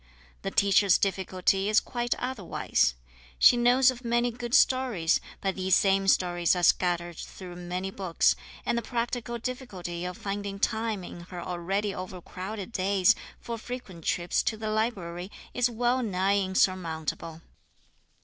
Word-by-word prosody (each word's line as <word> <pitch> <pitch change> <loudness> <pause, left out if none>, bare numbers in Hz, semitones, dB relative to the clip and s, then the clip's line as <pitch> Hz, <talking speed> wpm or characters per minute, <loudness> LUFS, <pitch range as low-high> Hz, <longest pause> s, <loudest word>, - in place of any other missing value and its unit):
The - - -2
teacher's 200 -1 +4
difficulty 190 0 0
is 215 - +5
quite 240 -1 -2
otherwise. 215 - 0 0.4
She - - +7
knows 250 +2 +5
of 245 0 -10
many 240 +1 +1
good 240 +1 -2
stories, 250 -13 +3 0.2
but 195 -1 0
these 185 -1 +2
same 195 0 +3
stories 175 -2 +3
are 180 - -2
scattered 175 -1 +2
through 180 -2 -9
many 180 +2 -4
books, 185 -4 +2 0.3
and 240 - +1
the 235 - 0
practical 235 0 -3
difficulty 205 -9 -5
of 180 0 -5
finding 200 0 -4
time 220 -1 -1
in 175 - -9
her 180 - -6
already 190 +4 -2
overcrowded 185 +3 -6
days 195 0 +3 0.3
for 235 -1 -5
frequent 215 -8 -8
trips 175 +2 +1
to 220 - -1
the 215 0 -3
library 190 -5 -2 0.2
is 245 0 +2
well 245 +2 +1
nigh 200 -2 +1
insurmountable. 165 -4 -1
195 Hz, 140 wpm, -28 LUFS, 180-235 Hz, 0.4 s, She